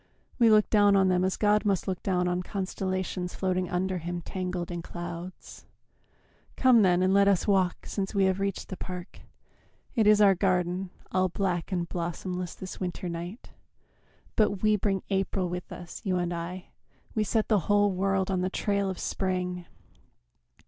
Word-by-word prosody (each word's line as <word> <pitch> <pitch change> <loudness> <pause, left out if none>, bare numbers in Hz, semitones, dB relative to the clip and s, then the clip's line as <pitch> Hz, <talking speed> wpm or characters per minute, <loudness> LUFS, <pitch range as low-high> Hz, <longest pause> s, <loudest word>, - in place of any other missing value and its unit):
We 235 -2 +6
look 215 -1 +5
down 205 -2 +5
on 190 -1 +4
them 180 0 +2
as 185 0 0
God 210 0 +3
must 200 -4 0
look 185 -2 -2
down 180 -2 0
On 180 0 0
constellations 185 -1 -3
floating 185 -1 -1
under 185 +1 -1
Him 175 +1 -4
Tangled 180 -1 -4
in 175 -1 -4
clouds.... 175 +1 -8 0.9
Come, 255 -3 +5
then, 180 -2 +4
and 185 +1 +3
let 200 0 +5
us 200 0 +2
walk 190 -3 +1
Since 195 +1 -3
we 195 -1 +4
have 190 0 +1
reached 195 -1 -2
the 190 - -6
park. 180 -1 -7 0.7
It 220 -4 +3
is 210 0 +6
our 200 -2 +7
garden, 185 0 0 0.2
All 185 0 +2
black 180 -1 -2
and 175 -2 -1
blossomless 175 +1 -4
this 190 - -8
winter 180 -1 -4
night, 170 +6 -7 0.8
But 205 -2 +1
we 215 0 +4
bring 195 -1 -1
April 190 -1 0
with 180 0 -6
us, 175 -1 -8
you 185 -4 0
and 175 -1 -1
I; 175 +2 -6 0.4
We 215 - +1
set 220 +1 0
the 215 -3 +3
whole 205 0 +4
world 195 0 0
on 185 -1 0
the 185 - 0
trail 200 0 0
of 190 - -4
spring. 180 -2 -2
185 Hz, 175 wpm, -28 LUFS, 180-200 Hz, 0.9 s, our